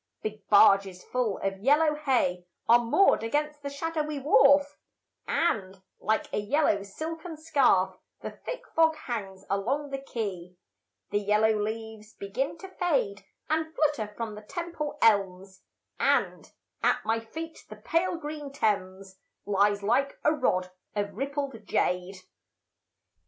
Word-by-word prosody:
Big 215 Hz, -1 st, -6 dB
barges 195 Hz, -2 st, +5 dB
full 245 Hz, -6 st, -1 dB
of 195 Hz, 0 st, -2 dB
yellow 300 Hz, +7 st, +4 dB
hay 250 Hz, -12 st, 0 dB, 0.2 s
Are 235 Hz, +1 st, +7 dB
moored 240 Hz, +12 st, +3 dB
against 295 Hz, +6 st, -1 dB
the 280 Hz, -, -4 dB
shadowy 305 Hz, +1 st, -3 dB
wharf, 280 Hz, +1 st, +4 dB, 0.5 s
And, 195 Hz, -, 0 dB, 0.2 s
like 220 Hz, 0 st, 0 dB
a -, -, +1 dB
yellow 210 Hz, -1 st, +2 dB
silken 320 Hz, -, -6 dB
scarf, 265 Hz, -, +2 dB, 0.2 s
The -, -, -6 dB
thick -, -, -7 dB
fog 320 Hz, -1 st, +4 dB
hangs 205 Hz, -9 st, -6 dB
along 265 Hz, +9 st, -1 dB
the 275 Hz, -, -3 dB
quay. 190 Hz, -9 st, -5 dB, 0.6 s
The 205 Hz, -, +2 dB
yellow 210 Hz, +2 st, +3 dB
leaves 220 Hz, 0 st, -5 dB
begin 245 Hz, +11 st, -3 dB
to 385 Hz, -, -9 dB
fade 405 Hz, +4 st, -1 dB, 0.2 s
And 315 Hz, +1 st, -1 dB
flutter 285 Hz, -9 st, 0 dB
from 230 Hz, -2 st, -4 dB
the 210 Hz, -, -9 dB
Temple 335 Hz, -, -5 dB
elms, 195 Hz, -3 st, +2 dB, 0.4 s
And -, -, +1 dB, 0.3 s
at -, -, +1 dB
my 225 Hz, +1 st, +1 dB
feet 320 Hz, +9 st, -8 dB
the -, -, -8 dB
pale 345 Hz, +2 st, 0 dB
green 295 Hz, -2 st, -6 dB
Thames 195 Hz, -6 st, -2 dB, 0.3 s
Lies 205 Hz, 0 st, +2 dB
like 270 Hz, +6 st, +1 dB
a 300 Hz, -, +4 dB
rod 185 Hz, -11 st, 0 dB, 0.2 s
of 205 Hz, -1 st, -2 dB
rippled 275 Hz, -1 st, -4 dB
jade. 180 Hz, +1 st, 0 dB
230 Hz, 135 wpm, -28 LUFS, 200-300 Hz, 0.6 s, Are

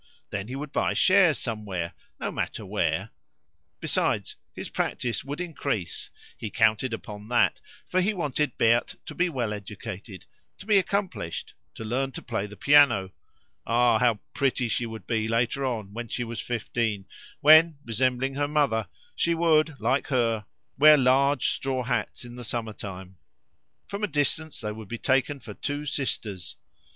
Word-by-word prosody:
Then 100 Hz, -1 st, -3 dB
he 130 Hz, -, -5 dB
would 140 Hz, +1 st, -5 dB
buy -, -, +1 dB
shares 185 Hz, -5 st, +5 dB
somewhere, 100 Hz, -7 st, -3 dB, 0.3 s
no -, -, -2 dB
matter -, -, -3 dB
where; -, -, -1 dB, 0.7 s
besides, -, -, 0 dB, 0.2 s
his -, -, -6 dB
practice 120 Hz, -4 st, -2 dB
would 145 Hz, +3 st, -5 dB
increase; 140 Hz, -, -3 dB, 0.3 s
he 110 Hz, -, -5 dB
counted 115 Hz, +3 st, +2 dB
upon 105 Hz, -2 st, -7 dB
that, 120 Hz, 0 st, +3 dB, 0.3 s
for 185 Hz, -, +1 dB
he 195 Hz, +4 st, +2 dB
wanted 150 Hz, -, -1 dB
Berthe 115 Hz, +1 st, +3 dB
to -, -, -7 dB
be 180 Hz, 0 st, +1 dB
well 120 Hz, -8 st, -2 dB
educated, 100 Hz, -1 st, -8 dB, 0.3 s
to -, -, -12 dB
be 210 Hz, -2 st, +5 dB
accomplished, 180 Hz, -, -3 dB, 0.2 s
to 110 Hz, -, -7 dB
learn 130 Hz, +4 st, -1 dB
to -, -, -6 dB
play 110 Hz, -4 st, -2 dB
the 105 Hz, 0 st, -12 dB
piano. 135 Hz, -10 st, +5 dB, 0.6 s
Ah! 120 Hz, -1 st, +4 dB
how 120 Hz, -4 st, +3 dB
pretty 130 Hz, -3 st, +1 dB
she 115 Hz, +1 st, -1 dB
would 110 Hz, -3 st, -8 dB
be 110 Hz, -1 st, 0 dB
later 115 Hz, +4 st, 0 dB
on 110 Hz, -6 st, -3 dB
when 120 Hz, +1 st, -5 dB
she 120 Hz, -, -2 dB
was 115 Hz, -1 st, -5 dB
fifteen, 115 Hz, -4 st, -2 dB, 0.4 s
when, 155 Hz, +1 st, +7 dB
resembling 130 Hz, +3 st, 0 dB
her 145 Hz, +1 st, 0 dB
mother, 145 Hz, -7 st, +1 dB, 0.3 s
she 170 Hz, 0 st, +2 dB
would, 160 Hz, -3 st, +3 dB
like 125 Hz, +5 st, +1 dB
her, 115 Hz, -6 st, +1 dB, 0.3 s
wear 150 Hz, +1 st, +9 dB
large 135 Hz, +1 st, +3 dB
straw 130 Hz, -1 st, -1 dB
hats 125 Hz, 0 st, -2 dB
in 120 Hz, -, -10 dB
the 125 Hz, 0 st, -8 dB
summer 115 Hz, -1 st, -3 dB
time; 95 Hz, -2 st, -8 dB, 0.7 s
from 200 Hz, +1 st, -5 dB
a -, -, +3 dB
distance 155 Hz, +1 st, 0 dB
they 105 Hz, -1 st, -3 dB
would 110 Hz, -1 st, -8 dB
be 115 Hz, -, -5 dB
taken 135 Hz, +3 st, +1 dB
for 110 Hz, -4 st, -9 dB
two 145 Hz, +6 st, -4 dB
sisters. 105 Hz, -, -3 dB
120 Hz, 165 wpm, -27 LUFS, 110-145 Hz, 0.7 s, wear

